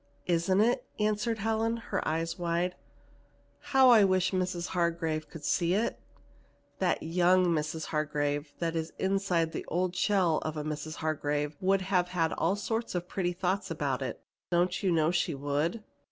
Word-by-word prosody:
"Isn't 180 +3 +2
it?" 245 +3 +2
answered 215 +2 0
Helen, 225 +2 0
her 230 - -3
eyes 165 +3 -2
wide. 175 +1 0 0.9
"How 265 -2 +5
I 220 -3 +7
wish 185 -2 +2
Mrs. 180 -2 -1
Hargrave 165 -3 -1
could 150 -3 -9
see 175 +1 +2
it! 220 +3 -1 0.8
That - - +1
young 180 +2 +3
Mrs. 160 -1 -1
Hargrave 145 -1 -1
that 170 -1 -2
is 160 0 -3
inside 190 -4 +1
the - - -4
old 180 +1 -1
shell 185 -6 +2
of 155 0 -4
a 150 - -2
Mrs. 155 +1 -4
Hargrave 150 -1 -1
would 195 +1 +3
have 185 -2 +1 0.3
all 195 - +1
sorts 225 +1 -3
of 175 0 -2
pretty 180 -2 -1
thoughts 185 +2 -1
about 145 -5 -2
it. 130 -3 -4 0.3
Don't 180 +1 +1
you 190 - +1
know 160 -1 +3
she 175 -3 0
would?" 145 +9 -1
175 Hz, 160 wpm, -30 LUFS, 155-190 Hz, 0.9 s, I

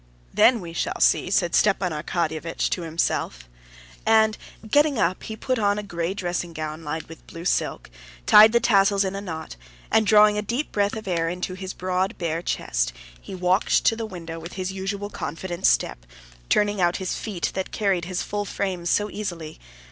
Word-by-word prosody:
"Then 235 -3 +5
we 170 -2 -8
shall - - -2
see," - - +3
Stepan 185 0 +2
Arkadyevitch 160 +1 -2
said - - +1
to 180 - -1
himself, 155 - -2 0.6
and 220 -1 +4 0.3
getting 290 +3 +3
up 185 -3 +1
he 220 - -6
put 255 +1 -1
on 205 -1 +2
a 210 - -3
gray 175 -1 -3
dressing 175 -2 -3
gown 155 0 -5
lined 160 +1 -4
with 165 0 -14
blue 165 +1 -9
silk, - - -1 0.4
tied 215 +1 +8
the 235 - +4
tassels 200 -3 +3
in 190 +1 -3
a 200 - -4
knot, 160 - -7 0.3
and, 220 -1 +3
drawing 210 0 +6
a - - 0
deep 235 +8 -3
breath 205 0 0
of 220 -2 -7
air 165 -2 0
into 180 +1 -4
his 185 0 -7
broad, 185 +1 -1
bare 165 -1 -2
chest, - - -1 0.3
he - - -8
walked 185 +2 +2
to 225 - +4
the 225 -1 -4
window 165 -4 -7
with 165 +2 -9
his 185 0 -3
usual 195 +2 -4
confident 175 +3 -2
step, - - +1 0.5
turning 205 -1 +2
out 175 0 +2
his 190 -2 -3
feet 195 -6 -3
that 190 - -4
carried 195 -5 0
his 185 0 -3
full 205 0 -3
frame 190 -3 -3
so 205 +4 +2
easily. 170 -7 -6
185 Hz, 185 wpm, -24 LUFS, 170-205 Hz, 0.6 s, tied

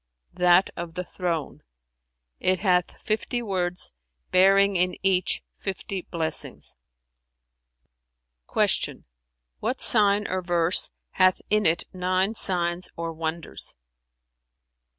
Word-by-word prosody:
"That 180 +1 +4
of 170 -1 -7
the 180 - -3
Throne; 170 -4 -4 0.8
it 185 0 +2
hath 180 -2 0
fifty 230 +3 -2
words, 180 -4 0 0.4
bearing 195 +2 +4
in 180 0 +1
each 185 -1 +1
fifty 195 -1 -6
blessings." 160 -2 -2 1.8
Q - - 0 0.6
"What 245 +5 -2
sign 210 -2 +5
or 185 0 -2
verse 175 0 +2 0.2
hath 185 -1 +3
in 210 -2 +4
it 165 +1 +1
nine 185 +3 0
signs 175 -4 +2
or 165 0 -4
wonders?" 160 0 -3
185 Hz, 100 wpm, -25 LUFS, 175-195 Hz, 1.8 s, sign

